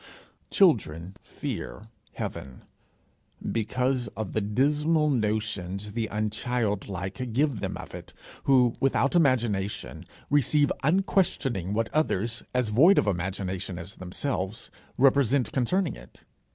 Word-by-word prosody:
Children 95 Hz, -, +2 dB
fear 110 Hz, -, -6 dB, 0.3 s
heaven, 65 Hz, -1 st, -6 dB, 0.9 s
because 125 Hz, +2 st, 0 dB
of 110 Hz, -3 st, -4 dB
the 110 Hz, -, +1 dB
dismal 150 Hz, +8 st, +2 dB
notions 105 Hz, -4 st, -2 dB
the 115 Hz, +1 st, -2 dB
unchildlike 105 Hz, -1 st, -2 dB
give 140 Hz, -2 st, +1 dB
them -, -, -3 dB
of -, -, -10 dB
it, -, -, -9 dB, 0.3 s
who, 125 Hz, -4 st, +4 dB
without 135 Hz, +2 st, +2 dB
imagination, 120 Hz, -, +1 dB, 0.3 s
receive 145 Hz, +1 st, +3 dB
unquestioning 145 Hz, -, +1 dB
what 115 Hz, 0 st, -1 dB
others, 120 Hz, -7 st, 0 dB
as 125 Hz, -3 st, 0 dB
void 155 Hz, -, +6 dB
of -, -, +4 dB
imagination 95 Hz, 0 st, -2 dB
as 90 Hz, +3 st, -8 dB
themselves, 95 Hz, +2 st, -3 dB, 0.3 s
represent 135 Hz, -2 st, +3 dB
concerning 175 Hz, +8 st, 0 dB
it. -, -, -15 dB
115 Hz, 110 wpm, -27 LUFS, 100-135 Hz, 0.9 s, void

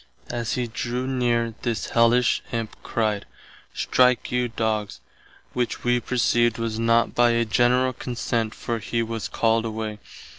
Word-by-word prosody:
As 120 Hz, -2 st, -2 dB
he 125 Hz, -, -1 dB
drew 120 Hz, +2 st, -3 dB
near, 120 Hz, -3 st, 0 dB
this 115 Hz, -3 st, -2 dB
Hellish 115 Hz, 0 st, +4 dB
Imp 115 Hz, -2 st, -3 dB
cried, 105 Hz, -3 st, -1 dB, 0.4 s
Strike 125 Hz, -1 st, +2 dB
you 125 Hz, 0 st, +1 dB
doggs, 110 Hz, -3 st, -2 dB, 0.5 s
which 125 Hz, -1 st, -2 dB
[wee] 120 Hz, 0 st, +2 dB
perceived 120 Hz, -1 st, +1 dB
was 115 Hz, -1 st, -2 dB
not 115 Hz, 0 st, +3 dB
by 120 Hz, 0 st, +4 dB
a 115 Hz, 0 st, +2 dB
general 125 Hz, +3 st, +3 dB
consent 115 Hz, -2 st, -2 dB
for 115 Hz, -1 st, -3 dB
he 115 Hz, +2 st, -1 dB
was 115 Hz, -1 st, -4 dB
called 115 Hz, 0 st, +1 dB
away. 110 Hz, -1 st, -4 dB
115 Hz, 145 wpm, -24 LUFS, 115-120 Hz, 0.5 s, Hellish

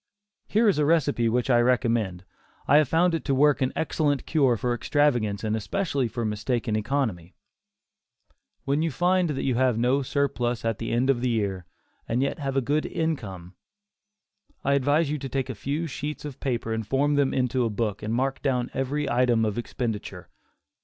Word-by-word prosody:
Here 220 Hz, +2 st, +3 dB
is 195 Hz, -7 st, +3 dB
a 150 Hz, -, +3 dB
recipe 145 Hz, -7 st, +2 dB
which 125 Hz, +3 st, 0 dB
I 120 Hz, -, +5 dB
recommend; 115 Hz, -7 st, +1 dB, 0.4 s
I 145 Hz, -, +6 dB
have 150 Hz, -2 st, +4 dB
found 170 Hz, +4 st, +2 dB
it 165 Hz, -, -1 dB
to 140 Hz, -, +1 dB
work 145 Hz, +1 st, +3 dB
an 130 Hz, -, +1 dB
excellent 145 Hz, -3 st, 0 dB
cure 135 Hz, -7 st, +2 dB
for 120 Hz, +4 st, -1 dB
extravagance 120 Hz, -6 st, +1 dB
and 110 Hz, 0 st, 0 dB
especially 135 Hz, -, -1 dB
for 115 Hz, +1 st, -4 dB
mistaken 110 Hz, +2 st, -1 dB
economy: 110 Hz, -7 st, -2 dB, 1.3 s
When 140 Hz, +2 st, +1 dB
you 165 Hz, -, +1 dB
find 180 Hz, +3 st, +1 dB
that 140 Hz, -3 st, -2 dB
you 130 Hz, -, +1 dB
have 125 Hz, -1 st, +2 dB
no 125 Hz, +4 st, +2 dB
surplus 125 Hz, -4 st, -1 dB
at 115 Hz, -3 st, -1 dB
the 115 Hz, -, -3 dB
end 125 Hz, +3 st, +3 dB
of 120 Hz, -3 st, -2 dB
the 125 Hz, -, +1 dB
year, 100 Hz, -6 st, -2 dB, 0.4 s
and 120 Hz, +3 st, +1 dB
yet 140 Hz, -, -2 dB
have 135 Hz, -2 st, -2 dB
a -, -, +3 dB
good 145 Hz, +5 st, 0 dB
income, 100 Hz, -, -4 dB, 1.1 s
I 140 Hz, -, +2 dB
advise 145 Hz, +3 st, +2 dB
you 150 Hz, -, -2 dB
to 135 Hz, 0 st, -6 dB
take 130 Hz, -1 st, -2 dB
a -, -, -5 dB
few 140 Hz, +9 st, -3 dB
sheets 150 Hz, 0 st, -5 dB
of 145 Hz, -2 st, -7 dB
paper 120 Hz, -4 st, -2 dB
and 110 Hz, -1 st, -3 dB
form 140 Hz, +4 st, +1 dB
them 140 Hz, -2 st, +2 dB
into 125 Hz, -1 st, 0 dB
a 115 Hz, -, 0 dB
book 105 Hz, -1 st, -2 dB
and 110 Hz, -, -3 dB
mark 135 Hz, +3 st, -1 dB
down 125 Hz, -3 st, 0 dB
every 140 Hz, +2 st, -1 dB
item 120 Hz, -2 st, +2 dB
of 105 Hz, -2 st, -1 dB
expenditure. 110 Hz, -6 st, -5 dB
130 Hz, 190 wpm, -26 LUFS, 115-145 Hz, 1.3 s, I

